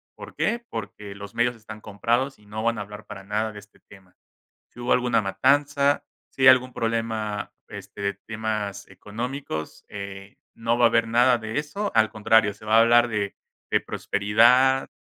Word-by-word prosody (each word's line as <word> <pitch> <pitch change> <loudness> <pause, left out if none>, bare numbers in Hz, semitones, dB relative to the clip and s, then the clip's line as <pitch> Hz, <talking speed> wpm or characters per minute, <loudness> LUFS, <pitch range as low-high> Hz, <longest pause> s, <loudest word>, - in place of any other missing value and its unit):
¿Por - - -11
qué? 235 0 -1
Porque 105 -2 -7
los 100 0 -10
medios 120 +1 +1
están 110 -1 -11
comprados 120 +6 -1
y 105 - -22
no 110 +1 -5
van 115 0 +1
a - - -3
hablar 105 +1 -9
para 95 - -9
nada 105 +2 -2
de 105 - -9
este 105 +1 -20
tema. 95 -2 -19 0.6
Si 120 - -13
hubo 120 - 0
alguna 120 -3 +2
matanza, 140 +8 +2 0.3
si 135 - -6
hay 130 - +8
algún 130 0 +5
problema, 110 -2 -2 0.2
este, - - -10
de 100 0 -1
temas 105 -1 -4
económicos, 100 - -6
eh, 100 -1 -8 0.2
no 115 +1 -1
va 120 - +6
a - - +6
haber 115 0 +2
nada 120 +2 +4
de 110 +2 -4
eso, 175 +8 -3
al 110 -1 +4
contrario, 110 -1 +3
se 105 - -16
va 110 +1 +3
a - - +8
hablar 120 +1 +5
de 105 -3 -2 0.4
de - - +5
prosperidad, 120 +6 +3
110 Hz, 185 wpm, -24 LUFS, 105-120 Hz, 0.6 s, hay